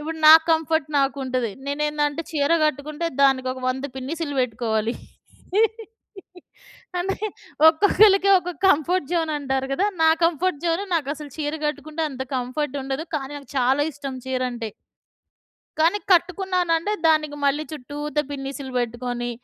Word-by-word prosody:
ఇప్పుడు 320 Hz, +2 st, -5 dB
నా 315 Hz, -, +12 dB, 0.2 s
కంఫర్ట్ 320 Hz, -2 st, +1 dB
నాకుంటది. 260 Hz, -4 st, -1 dB, 0.2 s
నేనేందంటే 295 Hz, +1 st, -1 dB
చీర 295 Hz, +1 st, +1 dB
కట్టుకుంటే, 305 Hz, +3 st, -3 dB
దానికి 265 Hz, -2 st, +3 dB
ఒక 260 Hz, -, -9 dB
వంద 265 Hz, +2 st, -4 dB
పిన్నీసులు 285 Hz, +2 st, -4 dB
పెట్టుకోవాలి. 225 Hz, -1 st, -1 dB, 2.1 s
అంటే, 385 Hz, +2 st, -2 dB, 0.5 s
ఒక్కొక్కళ్ళకి 395 Hz, +3 st, +5 dB
ఒక్కొక్క 355 Hz, -3 st, -7 dB
కంఫర్ట్ 335 Hz, -1 st, +2 dB
జోనంటారు 290 Hz, -5 st, -1 dB
గదా! 380 Hz, +9 st, +1 dB, 0.2 s
నా 320 Hz, -, +6 dB, 0.2 s
కంఫర్ట్ 345 Hz, -1 st, +1 dB
జోను 335 Hz, +4 st, 0 dB
నాకసలు 295 Hz, -2 st, -3 dB
చీర 295 Hz, 0 st, -2 dB
కట్టుకుంటే, 300 Hz, +2 st, -4 dB
అంత 260 Hz, -1 st, -5 dB
కంఫర్ట్ 255 Hz, +3 st, -3 dB
ఉండదు. 270 Hz, +3 st, -3 dB
కాని 270 Hz, -1 st, -5 dB
నాకు 280 Hz, -3 st, -16 dB
చాలా 260 Hz, +3 st, +3 dB
ఇష్టం 275 Hz, -1 st, -6 dB
చీరంటే. 250 Hz, -3 st, -2 dB, 1.1 s
కానీ 340 Hz, +6 st, +3 dB
కట్టుకున్నానంటే 360 Hz, 0 st, +1 dB, 0.2 s
దానికి, 305 Hz, -2 st, +2 dB
మళ్ళీ 295 Hz, +2 st, +1 dB
చుట్టూత 295 Hz, +1 st, -5 dB
పిన్నిసులు 275 Hz, -1 st, -6 dB
పెట్టుకొని 240 Hz, 0 st, -3 dB
290 Hz, 120 wpm, -23 LUFS, 265-325 Hz, 2.1 s, నా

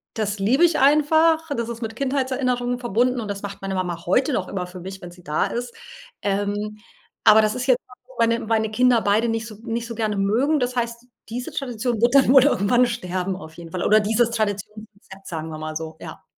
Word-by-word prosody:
das 210 Hz, -1 st, -2 dB
liebe 250 Hz, -, +3 dB
ich 335 Hz, -2 st, +1 dB
einfach, 315 Hz, +3 st, +4 dB
das 235 Hz, 0 st, -2 dB
ist 235 Hz, 0 st, -6 dB
mit 225 Hz, 0 st, -5 dB
Kindheitserinnerungen 255 Hz, -2 st, -1 dB
verbunden 245 Hz, +2 st, +1 dB
und 215 Hz, -, -5 dB
das 200 Hz, 0 st, -4 dB
macht 200 Hz, -1 st, -7 dB
meine 195 Hz, 0 st, -3 dB
Mama 175 Hz, -2 st, -3 dB
heute 255 Hz, -, +2 dB
noch 185 Hz, -, -1 dB
immer 180 Hz, -2 st, -4 dB
für 180 Hz, 0 st, -10 dB
mich, 190 Hz, +1 st, -8 dB
wenn 175 Hz, -, -8 dB
sie 180 Hz, 0 st, -16 dB
da 150 Hz, -2 st, 0 dB
ist, 240 Hz, 0 st, -5 dB, 0.5 s
ähm, 205 Hz, +1 st, -2 dB, 0.5 s
aber 220 Hz, +1 st, +8 dB
das 215 Hz, 0 st, 0 dB
ist 250 Hz, 0 st, -3 dB
jetzt 255 Hz, -1 st, +4 dB
was, 250 Hz, 0 st, -17 dB
wo 260 Hz, -, -17 dB
meine 230 Hz, 0 st, +3 dB
meine 220 Hz, -1 st, 0 dB
Kinder 245 Hz, +1 st, +3 dB
beide 210 Hz, +4 st, +2 dB
nicht 225 Hz, -1 st, -2 dB
so 215 Hz, -, -10 dB
nicht 230 Hz, 0 st, -3 dB
so 230 Hz, -, -6 dB
gerne 215 Hz, -2 st, -1 dB
mögen. 245 Hz, +10 st, +2 dB
Das 250 Hz, 0 st, -1 dB
heißt, 235 Hz, 0 st, -3 dB, 0.2 s
diese 245 Hz, +2 st, -5 dB
Tradition 240 Hz, -3 st, -3 dB
wird 240 Hz, +3 st, +3 dB
dann 270 Hz, -2 st, +6 dB
wohl 270 Hz, -2 st, +8 dB
irgendwann 245 Hz, 0 st, +3 dB
sterben, 185 Hz, -5 st, -3 dB
auf 160 Hz, -4 st, -11 dB
jeden 170 Hz, 0 st, -10 dB
Fall 180 Hz, -, -3 dB
oder 215 Hz, +1 st, +5 dB
dieses 225 Hz, +3 st, +1 dB
Traditionsrezept, 210 Hz, -2 st, -5 dB
sagen 160 Hz, -1 st, -5 dB
wir 155 Hz, -, -6 dB
mal 155 Hz, 0 st, -5 dB
so. 160 Hz, 0 st, -6 dB
Ja. -, -, -9 dB
225 Hz, 220 wpm, -22 LUFS, 195-245 Hz, 0.5 s, aber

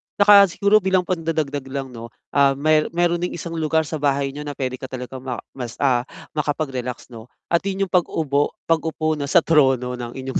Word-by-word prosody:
'Tsaka 205 Hz, -1 st, +7 dB
siguro, 200 Hz, +4 st, +3 dB
bilang 190 Hz, -2 st, +1 dB
pandadagdag 160 Hz, -6 st, -2 dB
lang, 135 Hz, -1 st, -5 dB
'no, 115 Hz, -1 st, -8 dB, 0.2 s
ah, 140 Hz, -1 st, +4 dB
mayr 155 Hz, +2 st, +2 dB
mayro'n 175 Hz, 0 st, +2 dB
ding 180 Hz, -, -3 dB
isang 170 Hz, 0 st, -6 dB
lugar 160 Hz, +1 st, +1 dB
sa 155 Hz, 0 st, -5 dB
bahay 140 Hz, -1 st, 0 dB
niyo 145 Hz, +1 st, -8 dB
na 145 Hz, -, -5 dB
puwede 130 Hz, -1 st, -3 dB
ka 130 Hz, -, -6 dB
talagang 130 Hz, 0 st, -7 dB
ma 125 Hz, -1 st, -5 dB, 0.2 s
mas, 120 Hz, -3 st, -7 dB
ah, 125 Hz, -2 st, +2 dB, 0.2 s
makapag-relax, 135 Hz, -5 st, -3 dB
'no, 115 Hz, 0 st, -11 dB, 0.2 s
at 170 Hz, -, +4 dB
'yon 195 Hz, 0 st, -1 dB
'yong 190 Hz, -, -5 dB
pag-ubo 150 Hz, -5 st, 0 dB
pag-upo, 160 Hz, -1 st, 0 dB
'no, 140 Hz, -, -3 dB
sa 170 Hz, +3 st, +4 dB
trono 130 Hz, -5 st, +3 dB
ng 120 Hz, 0 st, -6 dB
inyong 130 Hz, 0 st, -3 dB
145 Hz, 195 wpm, -21 LUFS, 130-165 Hz, 0.2 s, Tsaka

